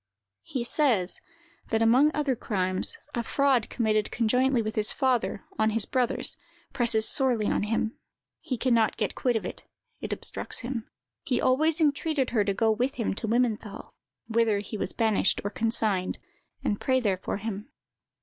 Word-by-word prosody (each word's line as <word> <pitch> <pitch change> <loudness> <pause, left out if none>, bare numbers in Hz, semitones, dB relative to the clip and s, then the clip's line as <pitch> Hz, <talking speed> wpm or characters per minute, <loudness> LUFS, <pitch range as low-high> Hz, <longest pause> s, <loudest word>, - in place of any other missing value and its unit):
"He 250 - -4
says, 235 - +1 0.5
that 225 0 +2
among 255 +6 +5
other 290 -3 0
crimes, 185 - -1 0.2
a 235 - -1
fraud 265 -1 +1
committed 215 -3 0
conjointly 250 +3 +2
with 215 -1 -2
his 215 0 +1
father, 250 -6 0 0.2
on 220 0 +3
his 220 -1 +1
brothers, 255 -2 +1 0.4
presses 225 -3 +3
sorely 250 -6 +3
on - - +1
him; 220 +2 -1 0.4
he 265 -7 -4
can 255 +1 +1
not 225 -2 +2
get 210 -3 -1
quit 245 -2 0
of 220 - -1
it; - - -6 0.4
it - - -6
obstructs - - -3
him. 240 -2 -5 0.3
He 260 -6 0
always 305 +5 +2
entreated 295 -2 +1
her 220 -3 +2
to 200 - 0
go 225 +2 +2
with 250 +5 0
him 230 -4 -1
to 220 - -4
Wimmenthal, 225 -3 -1 0.4
whither 225 -2 +2
he 205 +2 -5
was 200 - 0
banished, 220 -4 +1
or 205 - -3
consigned, 210 -2 0 0.5
and 205 - -1
pray 260 -1 +2
there 205 -6 0
for - - -3
him. 210 +2 -6
230 Hz, 170 wpm, -27 LUFS, 215-255 Hz, 0.5 s, among